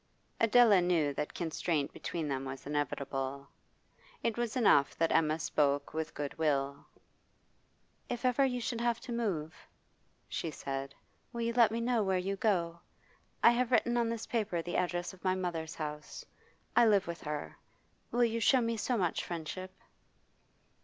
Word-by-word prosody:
Adela 230 -3 +6
knew 165 -5 +2
that 150 - -4
constraint 160 -3 -1
between 165 -3 -4
them 135 -2 -2
was 135 0 -7
inevitable; 140 -1 -3 0.8
it 230 - +1
was 240 -2 -2
enough 145 - +4
that 165 0 +2
Emma 155 -1 +3
spoke 145 -3 0
with 160 0 -3
good 145 -1 -4
will. 140 -2 0 1.2
'If 245 +1 -3
ever 255 +2 +3
you 250 -2 +1
should 235 0 -3
have 235 -1 +1
to 255 - -8
move,' 190 -10 -3 0.6
she 165 - -3
said, 135 -2 -5 0.4
'will 235 -1 -4
you 235 0 0
let 235 -2 +6
me 225 +2 -2
know 235 -1 +1
where 190 -2 +1
you 195 +2 -1
go? 175 -5 0 0.6
I 235 - +9
have 240 0 +1
written 240 0 +3
on 235 -1 +2
this 230 -1 -3
paper 210 -7 -1
the 175 +1 -4
address 175 +1 -1
of 190 - -17
my 185 -1 +2
mother's 170 -3 -3
house; 150 -1 -6 0.5
I 235 - +6
live 200 -3 +4
with 170 0 -6
her. 150 -1 -5 0.5
Will 240 +1 +2
you 230 -1 +1
show 260 +4 +5
me 230 -1 -1
so 245 +3 0
much 175 -5 0
friendship? 175 +2 -5
180 Hz, 165 wpm, -32 LUFS, 150-230 Hz, 1.2 s, I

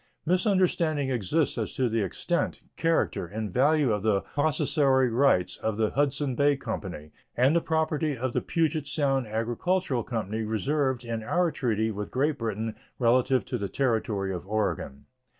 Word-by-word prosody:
Misunderstanding 175 - +2
exists 130 - 0
as - - -3
to 130 - +1
the 115 -1 0
extent, 95 - -2
character, 165 - 0
and 105 0 -5
value 145 0 +3
of 105 - -1
the 105 -2 +2
possessory 140 -3 +2
rights 115 -8 +2
of 110 -1 -2
the 110 -1 +1
Hudsons 140 -1 0
Bay 145 +2 +3
Company 95 - -6 0.3
and 130 +6 +4
the 170 - +3
property 160 -2 0
of 125 +1 -2
the - - +1
Pugets 155 -3 -1
Sound 135 -5 +1
Agricultural 120 - -1
Company 110 -2 -3
reserved 130 +4 -1
in 115 -1 -3
our 175 +8 +1
treaty 110 -5 0
with 105 -1 -5
Great 145 +3 0
Britain 110 -1 -3 0.2
relative 125 -1 +3
to - - -3
the 100 -1 -3
Territory 110 -6 0
of 90 - -5
Oregon. 100 -9 -2
125 Hz, 155 wpm, -27 LUFS, 110-150 Hz, 0.3 s, and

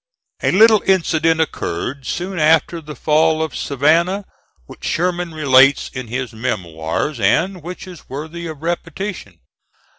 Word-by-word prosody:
A - - +1
little 215 +1 +6
incident 165 -3 +2
occurred, 135 - -3
soon 180 +1 -3
after 160 +2 +3
the 150 -1 -9
fall 155 +1 +2
of 160 - -5
Savannah, 165 +8 +1 0.4
which - - -14
Sherman 175 0 -1
relates 135 -3 +4
in 130 -2 -6
his 125 +1 -4
Memoirs, 105 - -3
and 175 - +1
which 180 +4 -8
is 180 -4 -13
worthy 160 +5 -6
of 155 -2 -8
repetition. 170 - -4
160 Hz, 130 wpm, -19 LUFS, 135-175 Hz, 0.4 s, little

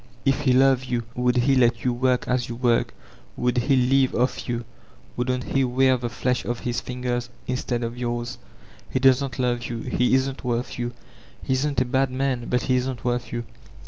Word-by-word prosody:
If 135 +1 +3
he 135 -3 +3
loved 130 0 +4
you, 120 -2 -1
would 125 0 +1
he 130 +3 +3
let 120 -2 +3
you 125 - +2
work 125 +1 +1
as 125 -1 0
yoo 120 - -4
work? 120 -1 +1 0.4
Would 125 0 +1
he 135 +3 +2
live 130 +1 +3
off 125 +1 0
you? 120 -1 -2 0.5
Wouldn't 125 +1 -1
he 135 - +3
wear 130 +1 +3
the 120 -1 -3
flesh 125 +2 -1
off 120 -1 -3
his 120 -1 -2
fingers 125 -1 -3 0.2
instead 125 -1 -2
of 115 +1 -3
yours? 120 0 -3 0.5
He - - -1
doesn't 130 0 +3
love 120 -2 0
you. 115 -1 -4
He 125 +2 +2
isn't 130 0 -1
worth 120 0 -2
you. 120 0 -2 0.5
He - - 0
isn't 140 +2 +1
a - - +2
bad 135 +1 +1
man, 130 -2 -1
but 125 0 +1
he 130 -1 +2
isn't 125 -1 -3
worth 120 0 -1
you. 120 0 -3
125 Hz, 200 wpm, -24 LUFS, 120-130 Hz, 0.5 s, loved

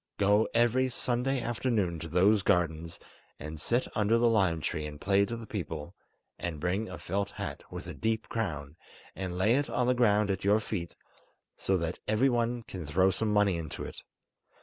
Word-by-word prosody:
Go 105 +2 +4
every 120 +3 +3
Sunday 125 +2 0
afternoon 115 -7 0
to 80 - -6
those 95 +5 +4
gardens; 85 -4 0 0.4
and 75 +1 -7
sit 120 +2 +1
under 110 +1 +3
the 120 0 +4
lime 95 -8 +3
tree 75 0 -2
and 75 -1 -9
play 100 +3 +3
to 120 - -4
the 115 - -8
people, 85 - -5 0.5
and 85 -3 -4
bring 95 +7 -1
a - - -6
felt 100 +2 -2
hat - - -6
with - - -6
a - - -6
deep 110 0 -1
crown, 80 -9 -3 0.4
and 95 -2 -4
lay 105 +5 +4
it 145 - -1
on 125 - +1
the 125 - +3
ground 105 -4 +3
at 95 -1 -3
your 105 +2 +4
feet, 95 -6 -4 0.6
so 95 - +1
that 85 0 -3
everyone 120 +1 +2
can 95 -5 -7
throw 95 +6 +3
some 110 +3 -1
money 105 -3 +3
into 80 -2 -5
it. - - -8
100 Hz, 185 wpm, -30 LUFS, 85-115 Hz, 0.6 s, Go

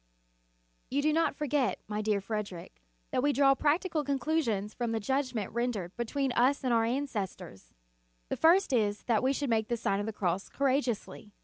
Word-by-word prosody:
You 285 +2 0
do 305 0 +3
not 325 -2 +2
forget, 280 -8 0
my 210 0 -2
dear 210 -1 +1
Frederic, 195 - -6 0.3
that - - +1
we 290 +2 +3
draw 275 -1 +5
practical 310 +3 +1
conclusions 265 -7 -1
from 235 -2 -2
the 225 - 0
judgment 255 -3 -1
rendered 225 -7 -2
between 265 +3 -1
us 255 +4 +2
and 255 -2 +1
our 225 -1 +3
an 260 +5 0
cestors. 190 - -6 0.6
The - - -1
first 340 -1 +4
is, 210 -4 +1
that 230 -3 +2
we 260 - +2
should 275 -2 -1
make 220 -1 +1
the 235 - -1
Sign 200 -3 0
of 205 - -3
the 220 - -3
Cross 185 -1 -2
courageously. 255 -6 -1
240 Hz, 185 wpm, -30 LUFS, 210-280 Hz, 0.6 s, draw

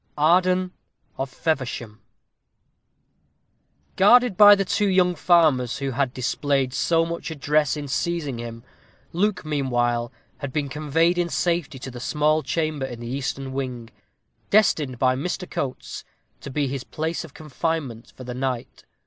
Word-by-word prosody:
Arden 180 +4 +3 0.5
of 135 0 -2
Feversham. 125 -7 -3 2.0
Guarded 240 +2 +6
by 205 +1 +9
the 195 -1 -1
two 205 +3 +1
young 185 -1 +3
farmers 155 -8 +3
who 135 -1 -3
had 135 0 0
displayed 130 +1 -1
so 165 +3 +2
much 170 0 -5
address 150 -2 +1
in 145 -1 -5
seizing 150 -3 -2
him, 115 0 -7 0.5
Luke, 195 0 0
meanwhile, 120 -5 0 0.3
had 140 -2 -5
been 145 0 -2
conveyed 160 +5 +1
in 175 -1 0
safety 170 -7 -1
to 130 0 -7
the 120 - -8
small 150 +4 +1
chamber 155 -2 -2
in 120 -2 -8
the 120 - -7
eastern 135 +1 -4
wing, 125 -4 -5 0.6
destined 155 - +3
by 130 +1 +2
Mr. 180 +6 -3
Coates 130 -2 -5 0.4
to - - -8
be 140 +1 -1
his 135 -1 -4
place 160 +5 -3
of 160 -4 -13
confinement 150 -5 -4
for 130 - -9
the 125 0 -6
night. 130 -1 -4
145 Hz, 145 wpm, -24 LUFS, 130-170 Hz, 2.0 s, by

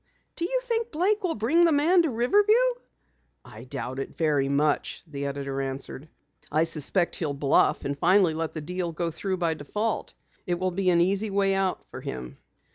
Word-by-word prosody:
"Do 340 - -1
you - - 0
think 465 -2 -1
Blake 390 +7 +1
will 350 -3 0
bring 270 +11 +3
the 335 - +5
man 320 +5 +4
to 330 - 0
Riverview?" 400 - +3 0.9
"I 120 -1 -11
doubt 130 0 -5
it 135 - -6
very 145 -4 +1
much," 145 +1 0
the 140 -3 -5
editor 140 -1 -3
answered. 135 +2 -5 0.4
"I 155 +2 +3
suspect 165 +3 0
he'll 150 -4 -2
bluff, 140 0 +2
and 140 - -1
finally 180 +2 +4
let 160 0 -3
the 155 - -5
deal 175 +2 -3
go 170 +1 -2 0.3
by 170 -2 0
default. 210 +9 -3 0.3
It 175 -1 0
will 185 +1 -1
be 185 +1 0
an 170 -1 +4
easy 200 +4 +1
way 195 0 +2
out 195 -1 -1
for - - -9
him." 60 -1 -7
175 Hz, 185 wpm, -26 LUFS, 145-225 Hz, 0.9 s, the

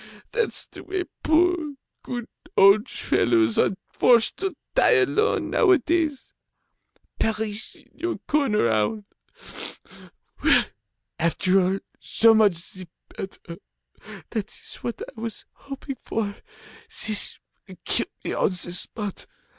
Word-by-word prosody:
That's 475 -3 -1
the - - -12
way 375 -1 -2 0.2
poor, 320 -2 +2 0.3
good 240 -2 -5 0.3
old 200 +2 +6
fellows 115 -2 +2
are 190 - +2 0.2
forced 235 -3 +4
to 385 -3 -2 0.2
die - - +5
alone, 425 +1 +2
nowadays. 330 - +2 0.9
Perish 220 0 -2
in - - -21
your 350 0 -3
corner, 275 - +2
owl! 110 - 0 1.4
Well, - - +5 0.5
after 185 +3 +3
all, 190 +1 +1 0.2
so 225 0 +4
much 200 -6 +2
the 185 -1 -10 0.3
better, 175 -3 -8 0.7
that 215 -2 -2
is - - -11
what 235 - -5
I 220 - -11
was 230 -1 -5
hoping 275 -1 -7
for, 205 -2 -2 0.5
this 215 -1 -1 0.3
will - - -12
kill - - +2 0.2
me - - -2
on - - +2
the 180 -2 -5
spot. 205 +2 -3
220 Hz, 120 wpm, -24 LUFS, 195-300 Hz, 1.4 s, old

